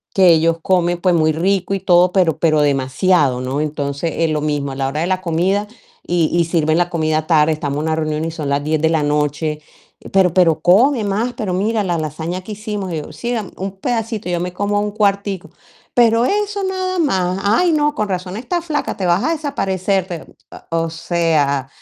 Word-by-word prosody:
que 190 -2 +6
ellos 165 0 +4
comen 175 -2 +1
pues 180 -1 +2
muy 155 -1 +3
rico 190 +4 0
y - - -2
todo, 180 -1 +4
pero 175 -5 +2
pero 155 -2 +3
demasiado, 140 +1 +2
¿no? 130 +3 -2
Entonces 150 +1 -3
es 165 -1 +1
lo 150 -1 -1
mismo 145 -2 -2
a - - -6
la 135 0 -1
hora 150 +3 -2
de 170 - 0
la 185 0 0
comida 185 +4 0 0.4
y 175 -2 +2
y 170 -1 +3
sirven 160 -1 +1
la 175 0 +1
comida 155 -2 -1
tarde, 155 -2 +4
estamos 145 -2 -3
en 150 - -2
una 160 0 0
reunión 155 0 -2
y 165 - -3
son 155 -3 -4
las 140 +1 0
10 155 0 0
de 160 - +3
la 160 -2 +1
noche. 150 +1 -1 0.5
"Pero 185 -3 +3
pero 170 -4 +3
come 225 - +4
más, 215 +5 -1
pero 195 -4 -3
mira 210 +3 0
la 175 -2 -1
lasaña 160 +4 -4
que 215 - -7
hicimos", 210 -3 -5
y - - -2
yo: 150 - -7
"Sí, 240 - -5
deme, 220 -6 -3
un 195 +1 -5
pedacito, 225 -3 -2
yo 175 -1 0
me 180 +1 -4
como 205 +2 0
un 210 - -1
cuartico", 200 -4 -1 0.4
pero 235 -1 +4
eso 410 +3 -1
nada 370 -1 -2
más. 190 - 0
"Ay, 225 - +3
no, 295 -1 +2
con 210 - -2
razón 185 +1 -3
estás 340 +9 -3
flaca, 295 -3 -2
te 190 - -2
vas 175 +2 +2
a 325 - +1
desaparecer". 195 - -1
Te 175 -4 -6 0.5
o 165 0 0
sea. 160 -5 0
175 Hz, 210 wpm, -18 LUFS, 155-205 Hz, 0.5 s, que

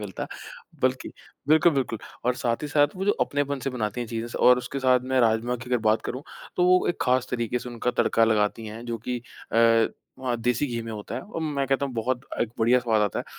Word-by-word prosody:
मिलता, 100 -4 -5 0.6
बल्कि 130 0 +1 0.4
बिल्कुल, 160 +2 +5
बिल्कुल। 130 -6 -1 0.3
और 125 +1 +2
साथ 120 +1 -1
ही 150 - -3
साथ 145 0 +3
वो 190 - -2
जो 205 - +4
अपनेपन 145 0 0
से 135 - -2
बनाती 110 -2 -3
हैं 120 - -3
चीज़ें 115 +1 -4
स - - -7
और 125 0 +7
उसके 135 +2 -5
साथ 130 -1 +4
मैं 130 - +5
राजमा 115 +2 +2
की 125 +1 -10
अगर 125 - +3
बात 110 0 +3
करूँ, 130 +3 -5 0.3
तो 180 - +3
वो 185 0 +4
एक 175 - -1
ख़ास 125 0 +2
तरीके 120 0 -1
से 125 - -8
उनका 120 +1 -2
तड़का 115 - +3
लगाती 110 0 +1
हैं, 110 +2 -8
जो 115 -1 -3
कि 125 -1 -1 0.3
अ, 115 0 +5 0.3
वहाँ 125 -2 -1
देसी 125 +4 +1
घी 120 -3 -3
में 115 - -7
होता 105 -1 -6
है। - - -3
और 175 -4 -7
मैं 140 -3 -1
कहता 135 +1 +1
हूँ 135 - -7
बहुत 120 +2 -1 0.2
अ, - - +1 0.2
बढ़िया 120 +3 +4
स्वाद 110 -3 +2
आता 105 - 0
है, - - -3
125 Hz, 240 wpm, -26 LUFS, 115-135 Hz, 0.6 s, और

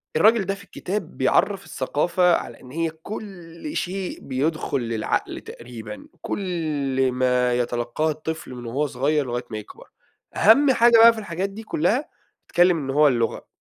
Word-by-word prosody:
الراجل 215 +5 +4
ده 195 +1 -1
في 200 - -13
الكتاب 195 -2 -5
بيعرَّف 195 +9 +2
الثقافة 170 +6 +1
على 115 - -6
إن 125 - -13
هي 165 +3 -1
كل 175 - -8
شيء 185 0 -3
بيدخُل 140 +1 -1
للعقل 115 -2 -2
تقريبًا، 115 -3 -10
كل 145 -8 -1
ما 125 -1 +2
يتلقّاه 120 +5 -1
الطفل 155 -2 -6
من 120 -1 -8
وهو 135 +6 -1
صغير 140 +3 0
لغاية 120 0 -3
ما 110 - -5
يكبر. 105 - -11 0.5
أهَم 270 +6 +6
حاجة 235 -2 +5
بقى 230 +1 +9
في 225 - -6
الحاجات 195 -1 -3
دي 210 +3 -9
كُلّها، 220 - 0 0.4
اتكلِّم 175 0 +4
إن 140 -4 -5
هو 150 +2 +5
اللغة، 120 -4 0
155 Hz, 155 wpm, -23 LUFS, 130-195 Hz, 0.5 s, بقى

